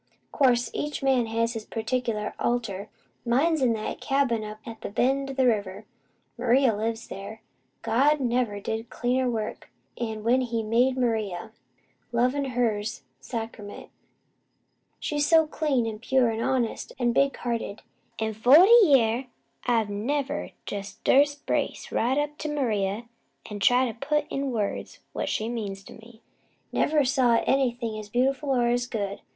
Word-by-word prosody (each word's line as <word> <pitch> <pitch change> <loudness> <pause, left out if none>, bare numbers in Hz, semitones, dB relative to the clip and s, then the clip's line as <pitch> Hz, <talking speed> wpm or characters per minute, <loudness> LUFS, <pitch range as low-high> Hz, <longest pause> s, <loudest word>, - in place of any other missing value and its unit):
"Course, 250 -4 +2
each 295 -1 -3
man 260 -4 +3
has 230 +1 0
his 225 -2 -5
particular 225 -2 -2
altar. 220 -5 -2 0.3
Mine's 280 +6 +2
in 245 -3 +3
that 215 -1 -4
cabin 270 -5 +1
up 215 0 -7
at 230 -2 -9
the - - -5
bend 270 +6 +1
o' - - -4
the 265 -1 +2
river. 205 -3 0 0.5
Maria 245 -1 +3
lives 225 +2 -3
there. 200 +3 -8 0.4
God 275 +7 +3
never 240 -5 0
did 220 +3 -4
cleaner 250 +1 0
work, 220 -3 -4 0.3
'an 220 -2 -4
when 245 +3 +3
He 235 -2 -2
made 245 +4 +2
Maria. 220 -5 -1 0.6
Lovin, 250 +4 +1
her's 230 - -1 0.2
sacrament. 215 - -7 1.1
She's 290 -1 0
so 325 -1 +6
clean, 295 -6 0
an' 220 -2 -4
pure, 250 0 +2
an' 225 0 -3
honest, 250 -1 -1
an' 240 -2 +1
big 275 +2 +2
hearted! 230 -3 -4 0.3
In 220 0 -2
forty 290 - +7
year 255 - +3 0.4
I've 225 -4 +2
never 275 +7 -2 0.2
jest 200 0 -6
durst 285 +1 +3
brace - - -2
right 250 +4 +1
up 295 0 -2
to 305 - -3
Maria 220 -5 -1 0.4
an' 205 - -5
try 245 +5 +4
to 235 - -3
put 300 +6 -1
in 275 0 -1
words 210 -4 -3 0.2
what - - -2
she 215 - -1
means 205 -5 -4
to - - -12
me. 225 0 -16 0.5
Never 300 -2 +2
saw 250 -2 +3
nothin' 260 0 +2
else 215 -1 -3
as - - -24
beautiful, 265 +5 0
or 250 -3 +2
as 245 0 0
good. 200 -4 -4
240 Hz, 155 wpm, -26 LUFS, 220-265 Hz, 1.1 s, forty